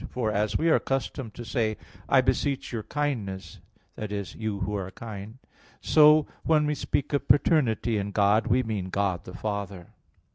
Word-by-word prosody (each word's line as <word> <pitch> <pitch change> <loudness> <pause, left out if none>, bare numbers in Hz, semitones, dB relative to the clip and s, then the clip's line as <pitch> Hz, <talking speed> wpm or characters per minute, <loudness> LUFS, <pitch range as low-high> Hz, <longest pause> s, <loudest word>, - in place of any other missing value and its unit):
For 115 -4 -1
as 105 +1 0
we 165 - 0
are - - +6
accustomed 130 -3 -3
to 120 - -7
say, 110 -3 -1 0.3
"I 135 -2 +6
beseech 130 +1 -1
your 115 - -2
kindness" 110 -9 -3 0.4
i.e. 105 -1 -3
you 110 -3 -3
who 100 +3 -2
are 95 -2 -3
kind 110 +2 -9 0.4
so 150 -1 +6 0.2
when 155 -2 +3
we 150 - +1
speak 145 0 -2
of 145 - 0
paternity 120 -6 +3
in 100 0 -3
God, 105 +3 +3
we 125 +2 +3
mean 105 -5 -3
God 95 -2 -1
the 90 - -9
Father. 100 -4 -5
110 Hz, 170 wpm, -27 LUFS, 100-135 Hz, 0.4 s, are